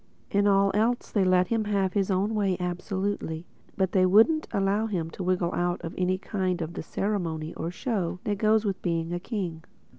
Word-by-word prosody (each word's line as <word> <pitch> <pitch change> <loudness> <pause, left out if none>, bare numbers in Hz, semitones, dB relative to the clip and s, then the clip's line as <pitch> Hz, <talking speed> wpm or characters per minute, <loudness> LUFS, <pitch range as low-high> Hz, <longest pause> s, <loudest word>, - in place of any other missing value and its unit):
In 200 0 +3
all 195 0 +4
else 230 +4 +1
they 200 - +2
let 185 0 +3
him 225 -2 +1
have 195 -3 0
his 200 -2 +1
own 195 +3 +1
way 200 -4 +1
absolutely; 180 -2 -3 0.3
but 190 -2 +1
they 185 - +3
wouldn't 220 - +5
allow 200 +1 +1
him 170 -6 -3
to 185 - -6
wriggle 180 -1 0
out 175 0 0
of 165 - -5
any 185 0 0
of 180 -4 -1
the - - -4
ceremony 165 -6 -2
or 165 - -4
show 185 -4 -2
that 205 -2 -2
goes 220 0 +3
with 195 -2 -2
being 165 -1 -1
a 175 - -1
king. 175 -6 -4
190 Hz, 190 wpm, -27 LUFS, 175-205 Hz, 0.3 s, wouldn't